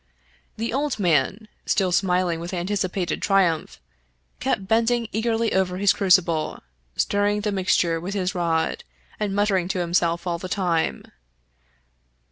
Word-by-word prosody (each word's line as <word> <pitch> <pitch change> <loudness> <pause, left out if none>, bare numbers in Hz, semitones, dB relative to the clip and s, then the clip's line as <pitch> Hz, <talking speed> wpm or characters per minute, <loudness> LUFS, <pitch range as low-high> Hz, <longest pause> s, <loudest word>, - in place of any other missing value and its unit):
The 225 +1 -3
old 290 +2 -1
man, 180 +4 +1 0.2
still 190 -3 +2
smiling 180 -2 +1
with 175 +2 -5
anticipated 185 0 -2
triumph, 185 -5 +1 0.6
kept 190 - -1
bending 230 +2 +2
eagerly 225 +1 0
over 185 -1 +1
his 200 +1 +4
crucible, 180 -5 +2 0.3
stirring 205 +1 +1
the 210 0 -1
mixture 180 -3 +1
with 190 +4 -5
his 185 -2 -1
rod, 170 - -1 0.4
and 205 -2 -1
muttering 200 -3 +1
to 190 0 -2
himself 170 0 0
all 170 -1 -2
the 185 - -6
time. 175 -4 0
190 Hz, 130 wpm, -23 LUFS, 175-205 Hz, 0.6 s, his